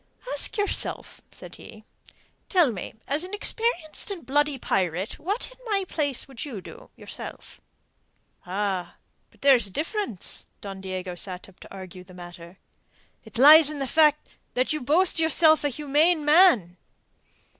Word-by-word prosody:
"Ask - - -3
yourself," 410 -1 -1
said - - -12
he. - - -13 0.7
"Tell 350 - +4
me, 195 -1 -7
as 290 +4 -1
an 375 +3 -6
experienced 415 -7 -1
and 385 -5 -6
bloody 290 +1 +1
pirate, 185 -4 -2
what 405 +9 -4
in - - -19
my 395 -2 +1
place 285 -7 -2
would 265 -4 -8
you 255 -9 -6
do, 480 - -13
yourself?" - - -8 0.8
"Ah, 190 -1 -3 0.3
but - - -27
there 275 -1 +7
is 235 -5 -1
a - - -11
difference." 310 - -4
Don 195 -1 -8
Diego 185 -1 -5
sat 180 +1 -5
up 195 - -20
to - - -14
argue 185 -2 -10
the 185 0 -16
matter. 175 0 -12 0.7
"It - - -9
lies 300 +4 +9
in 305 - -5
the 275 - -2
fact 300 +2 +3 0.3
that 255 +4 +1
you 305 - -3
boast 330 +7 +3
yourself 320 -1 +4
a 290 - +1
humane 300 +3 +1
man." 295 - +5
280 Hz, 155 wpm, -25 LUFS, -, 0.8 s, lies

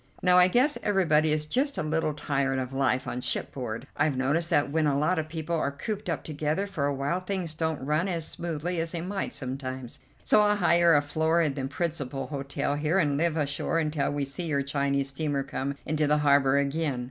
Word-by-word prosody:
Now 180 0 +6
I 180 - +7
guess 255 +10 +2
everybody 160 -7 +3
is 150 0 0
just 270 - 0
a - - -1
little 155 -1 0
tired 140 -2 0
of 130 0 -3
life 135 -1 +1
on 125 - -3
shipboard. 120 -2 -3
I've 145 -2 +1
noticed 150 +6 +1
that 145 -5 +2
when 155 0 +2
a 140 -1 +2
lot 160 +4 +1
of 155 - -3
people 160 +1 -3
are 155 -3 0
cooped 205 +7 -5
up 165 - -2
together 155 +5 -1
for 155 -8 -2
a 145 - 0
while 140 +6 -1
things 185 -3 -3
don't 160 -1 -2
run 155 +5 +1
on 180 - -1
as 165 -2 -3
smoothly 170 +1 -3
as 165 +1 -3
they 170 - -3
might 190 +3 -3
sometimes, 130 -1 -5 0.2
so 210 - +5
I'll 210 0 +3
hire 170 -4 +4
a 145 - +4
floor 160 +3 +1
in 155 -4 +2
the 135 -1 -3
principal 145 -4 -3
hotel 140 0 -3
here 150 +5 0
and 145 -6 +2
live 165 +2 +1
ashore 145 +2 -1
until 155 -2 0
we 145 -1 -1
see 140 +6 -5
your 140 -3 0
Chinese 140 0 0
steamer 140 -1 -2
come 135 +1 -3
into 155 -1 0
the 150 +1 +3
harbour 140 -2 +4
again. 140 -1 0
150 Hz, 215 wpm, -27 LUFS, 140-170 Hz, 0.2 s, I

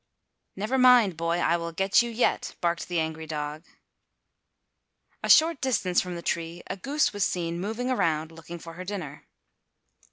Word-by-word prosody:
"Never 215 +7 -1
mind, 245 -7 +6
boy, 165 +1 -1
I 170 -1 +2
will 170 0 -5
get 195 +6 +3
you 240 - -3
yet," 235 +1 0
barked 170 -1 -1
the 175 -2 -1
angry 160 0 -3
dog. 150 +1 -5 1.6
A - - -3
short 320 -2 +6
distance 210 -9 +1
from 180 -1 -6
the 170 - -7
tree 170 +1 -3
a - - -4
goose 280 +9 0
was 205 -1 0
seen 170 -2 -1
moving 225 +6 -2
around 160 -9 0
looking 165 +1 -9
for 165 0 -10
her 180 +2 -7
dinner. 180 -7 -7
175 Hz, 165 wpm, -27 LUFS, 165-220 Hz, 1.6 s, mind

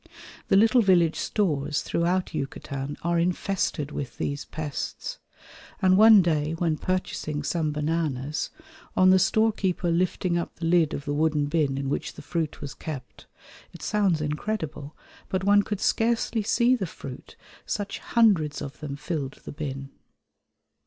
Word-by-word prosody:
The - - +3
little 225 +4 +5
village 175 -5 +4
stores 150 -8 0
throughout 180 +2 0
Yucatan 135 +1 -4
are 170 0 +1
infested 175 -4 -1
with 135 -4 -5
these 140 0 -3
pests, 155 -3 -5 0.6
and 185 0 +4
one 215 -1 +8
day 155 -2 0
when 165 -2 0
purchasing 155 -5 -2
some 155 0 0
bananas, 150 -2 -1 0.5
on 185 0 +6
the 190 - +6
storekeeper 195 -4 +1
lifting 175 0 +1
up 170 - -5
the 165 - -5
lid 165 -2 +3
of 140 - -6
the 145 - -1
wooden 150 -1 +2
bin 145 -3 0
in 135 0 -2
which 140 - -2
the - - -11
fruit 165 -3 -3
was 145 -1 -5
kept, 135 -6 -8 0.5
it - - -11
sounds 195 -7 +1
incredible, 150 -1 -4 0.3
but 190 0 -1
one 205 +1 +5
could 205 -1 -4
scarcely 225 +1 +1
see 235 +4 +3
the 195 -7 -3
fruit, 135 -3 -10 0.3
such 205 -1 -3
hundreds 195 -11 +2
of 140 0 -7
them 145 -2 -5
filled 145 -2 -4
the - - -6
bin. 140 -2 -5
165 Hz, 150 wpm, -26 LUFS, 145-190 Hz, 0.6 s, one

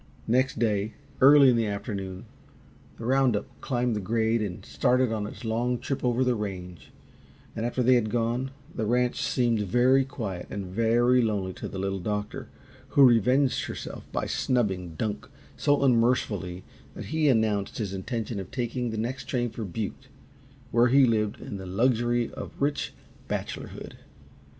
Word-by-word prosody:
Next 130 +3 +1
day, 110 -2 0 0.3
early 140 0 +8
in - - +2
the 115 -2 +1
afternoon, 100 -1 -5 0.7
the 115 - -7
round 130 -2 +3
up 105 - -2 0.2
climbed 120 -3 0
the - - -1
grade 110 +2 +1
and 95 -4 -5
started 125 -1 +2
on 105 -2 -2
its 110 - -9
long 120 +3 0
trip 135 +2 -4
over 125 +1 +2
the 125 -1 +2
range, 90 -6 -6 0.7
and, 115 +1 -1
after 125 +1 -1
they 130 +2 +5
had 120 -3 +2
gone, 120 +3 0 0.2
the 110 -3 -2
ranch 125 +2 +1
seemed 120 -3 +1
very 125 +7 +4
quiet 110 -9 -5
and 100 -2 -4
very 115 +6 +3
lonely 100 -5 -1
to - - -6
the - - -7
Little 95 0 -2
Doctor, 105 +2 -3 0.5
who 140 - +9
revenged 125 +4 +3
herself - - -7
by - - -1
snubbing 95 -9 -1
Dunk 110 +5 -3 0.3
so 145 -1 +2
unmercifully 115 -8 +1 0.3
that - - -7
he 155 -2 +3
announced 110 -5 +1
his 100 -4 -3
intention 110 +2 -3
of 95 - -7
taking 125 -1 -2
the 110 - -4
next 120 +4 -3
train 120 -3 -1
for 115 0 -5
Butte, 110 +7 -5 0.6
where 120 +1 +4
he 135 +2 +6
lived 110 -3 0
in 100 - -6
the 95 -1 -8
luxury 120 +3 +1
of - - -8
rich 145 +1 0 0.4
bachelorhood. - - -5
115 Hz, 165 wpm, -27 LUFS, 105-125 Hz, 0.7 s, who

